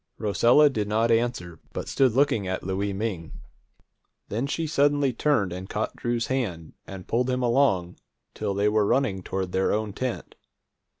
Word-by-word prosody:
Rosella 120 +7 +4
did 110 -7 -1
not 110 +2 +1
answer, 115 -8 -1
but - - -5
stood 130 -4 +2
looking 120 -7 +2
at 95 0 -3
Louie 95 +2 -2
Ming. 95 -5 -4 1.0
Then 115 +7 -2
she 165 +3 -2
suddenly 145 -3 +2
turned 110 -11 +1
and 95 +2 -7
caught 105 - -3
Drew's 120 -1 -1
hand, 100 -12 -3
and 95 -2 -9
pulled 125 +2 0
him 125 0 0
along 115 -9 +2 0.4
till 100 -2 -3
they 100 +1 +2
were 105 -1 +2
running 120 -7 +1
toward 95 0 -4
their 95 +1 +1
own 105 -1 -1
tent. 130 +2 -4
110 Hz, 165 wpm, -25 LUFS, 95-130 Hz, 1.0 s, Rosella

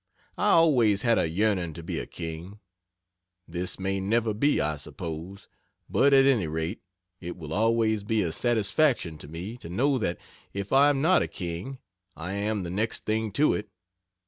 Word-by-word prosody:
I - - +3
always 125 -12 +4
had 115 -1 +3
a 80 - +1
yearning 90 -2 0
to 85 +2 -9
be - - -3
a - - -5
king. 85 +4 -7 0.9
This 90 +2 -3
may 95 +1 -1
never 110 +3 +1
be, 140 +8 +2
I 75 0 0
suppose, 85 +6 -7 0.4
but, 140 - +3
at 135 -1 +6
any 120 -11 +3
rate, 80 +6 -3 0.4
it 90 0 -7
will 80 -2 -7
always 110 0 +2
be 110 0 +1
a 85 - -2
satisfaction 115 - +1
to - - -10
me 90 +9 -7
to 85 - -10
know 130 +9 +1
that, 85 -6 -1 0.4
if 100 +2 -4
I 140 +2 +6
am 140 -1 +1
not 180 +2 +5
a - - 0
king, 90 +9 -6 0.4
I 85 +4 -5
am 105 0 -1
the 85 - -5
next 105 +5 -2
thing 110 0 -1
to 150 +7 +3
it. 105 0 -4
100 Hz, 180 wpm, -27 LUFS, 85-115 Hz, 0.9 s, at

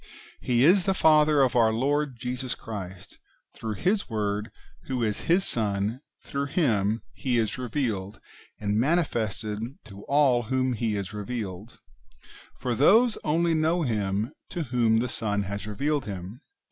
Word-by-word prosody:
He 120 0 +2
is 180 +2 +5
the 195 - +2
Father 150 -4 +5
of 130 - +1
our 115 -2 +5
Lord 140 +3 0
Jesus 125 +1 -3
Christ: 95 -5 -8 0.3
through 110 -1 -5
His 195 - 0
Word, 105 -1 -2 0.4
who 130 -3 -1
is 105 -2 -2
His 180 +3 +4
Son, 105 +2 -1 0.2
through 140 0 -3
Him 110 - +1
He 125 -3 -1
is 115 +1 -1
revealed 110 -6 -2 0.4
and 105 0 0
manifested 115 - 0 0.3
to 100 -2 -11
all 140 -4 +3
to 115 - -11
whom 130 -1 +1
He 110 -2 -1
is 100 0 -4
revealed; 105 -1 -6 0.8
for 125 - -2
those 215 - +4
[only] 165 +2 +2
know 160 +2 +2
Him 105 -3 -1 0.2
to 170 - -3
whom 120 -4 +2
the 120 +3 +1
Son 105 -4 -2
has 100 +2 -5
revealed 140 +7 -1
Him. 100 +5 -7
120 Hz, 150 wpm, -26 LUFS, 105-140 Hz, 0.8 s, is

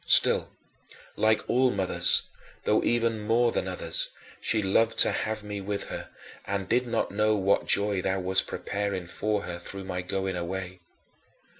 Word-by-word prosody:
Still, - - +4 0.7
like 110 0 +1
all 130 +1 +3
mothers 95 -5 +4 0.4
though - - +2
even 115 -2 +1
more 115 +3 +2
than - - -2
others - - -1 0.3
she 110 -1 +1
loved 115 +4 +1
to - - +8
have 110 -1 -3
me 105 -1 -6
with 100 +1 -4
her, - - -7 0.4
and 100 -1 -3
did 125 +3 +1
not 115 -1 -1
know 105 +1 +1
what 100 0 +1
joy 100 -2 +2
thou 95 +1 -1
wast 95 +1 +1
preparing 100 -3 -4
for 105 +4 -2
her 85 -1 -6
through 95 +3 -7
my 90 -1 -4
going 95 +1 -3
away. 90 +1 -5
100 Hz, 160 wpm, -27 LUFS, 95-110 Hz, 0.7 s, to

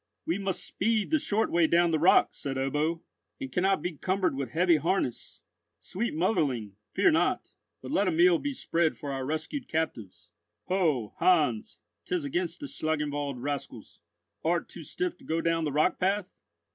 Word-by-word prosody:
"We 170 +4 -1
must 190 -2 -2
speed 220 +3 0
the 310 - +4
short 220 -4 0
way 170 -1 +4
down 170 0 +3
the 160 - +1
rock," 175 +4 +5
said 135 -1 -5
Ebbo, 150 +5 0 0.4
"and 135 - -6
cannot 190 +5 +1
be 175 -4 -3
cumbered 185 -2 0
with 135 -3 -3
heavy 170 +2 +3
harness. 165 -5 -2 0.4
Sweet 215 -1 -3
motherling, 145 - 0 0.2
fear - - +4
not; - - 0 0.3
but 130 - -6
let 200 - +2
a - - +3
meal 170 +1 +5
be 285 - -2
spread 170 - 0
for 145 - -5
our 135 -1 -3
rescued 160 - -3
captives. 150 - -4 0.4
Ho, 155 - +1
Heinz, 155 -11 +2 0.3
'tis 180 -5 -1
against 170 +4 -2
the - - -4
Schlangenwald 145 - -2
rascals. 145 0 -5 0.4
Art - - +1
too - - -10
stiff 365 -3 -3
to - - -19
go 165 +1 -1
down 165 -1 +1
the 150 - -1
rock 150 +5 +2
path?" 195 +2 +1
165 Hz, 170 wpm, -28 LUFS, 145-185 Hz, 0.4 s, rock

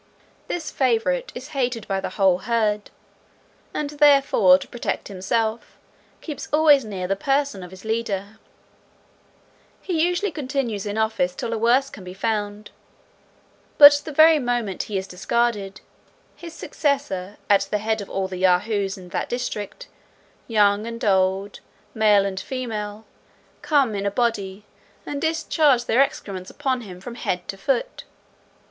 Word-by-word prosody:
This 330 -4 -4
favourite 275 - 0
is - - -8
hated 250 -6 -2
by 195 -1 -1
the - - -4
whole 190 -3 +2
herd, 210 -1 0 0.8
and 295 -1 -3
therefore, 275 -10 +5
to 185 - -9
protect 240 - -4
himself, 220 +4 -2 0.4
keeps 300 -5 -6
always 300 -2 +5
near 195 -4 -5
the 195 - 0
person 275 -1 0
of 180 - -9
his 190 +3 -13
leader. 220 -2 -3 1.4
He 335 -4 -1
usually 355 +3 0
continues 260 -8 -3
in 205 +1 -3
office 220 -5 0
till 230 - -4
a - - -1
worse 250 +4 +3
can 195 - -10
be 180 0 -9
found; 210 0 -3 1.1
but 290 0 +11
the 310 - -6
very 315 +1 +6
moment 240 -7 -1
he 205 - -1
is 190 - -3
discarded, 200 +1 -1 0.5
his 335 -2 -10
successor, 275 - -2
at 200 -1 +3
the 210 - 0
head 220 +1 -1
of 200 - -9
all 190 -1 -2
the 185 -1 -6
Yahoos 195 +2 +1
in 180 -1 -12
that - - -3
district, 245 - -4 0.6
young 210 -1 +2
and 230 -1 -5
old, 190 0 +1 0.3
male 210 -2 +4
and 190 -1 -3
female, 220 -3 -5 0.6
come 275 -7 +2
in 200 0 -2
a - - +3
body, 205 -3 -2 0.4
and 285 -1 -4
discharge 315 -5 +2
their 240 +3 +3
excrements 205 -11 -2
upon 265 -3 -2
him 185 -5 -10
from 235 +6 -8
head 180 -6 -3
to - - -5
foot. 285 - -2
220 Hz, 150 wpm, -23 LUFS, 195-275 Hz, 1.4 s, but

